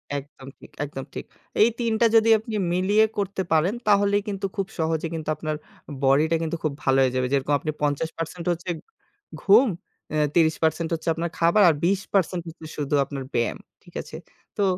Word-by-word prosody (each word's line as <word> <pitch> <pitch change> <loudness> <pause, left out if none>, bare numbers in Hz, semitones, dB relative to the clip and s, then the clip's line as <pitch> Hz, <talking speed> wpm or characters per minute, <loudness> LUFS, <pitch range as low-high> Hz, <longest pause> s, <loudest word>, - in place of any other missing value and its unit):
একদম 140 -1 -8
ঠিক, - - -15
একদম 135 -2 -7
ঠিক। - - -6 0.4
এই 225 - +7
৩ 230 -1 0
টা - - +6
যদি 225 0 +5
আপনি 220 0 -6 0.2
মিলিয়ে 205 +4 +3
করতে 200 -1 -1
পারেন 165 +6 +3
তাহলেই 205 0 +4
কিন্তু 195 -1 -3
খুব 195 -2 -2
সহজে 160 0 0
কিন্তু 155 -1 -4
আপনার 155 -1 -3 0.5
বডিটা 150 +5 +4
কিন্তু 165 +1 -2
খুব 150 -2 0
ভালো 135 0 +3
হয়ে 130 -1 +2
যাবে। 130 0 +1
যেরকম 140 +1 +1
আপনি 155 - -3
৫০% 165 +3 -2
হচ্ছে 175 +2 -4 0.7
ঘুম, 220 +7 +6 0.7
৩০% 160 0 +2
হচ্ছে 160 0 -4
আপনার 170 +1 -3
খাবার 170 +5 +4
আর - - +4
২০% 190 -2 0
হচ্ছে 165 -1 -10
শুধু 145 0 -1
আপনার 140 -1 -6
ব্যায়াম। 120 - 0 0.3
ঠিক - - -18
আছে? - - -11 0.4
তো 205 - +2
165 Hz, 170 wpm, -24 LUFS, 150-195 Hz, 0.7 s, এই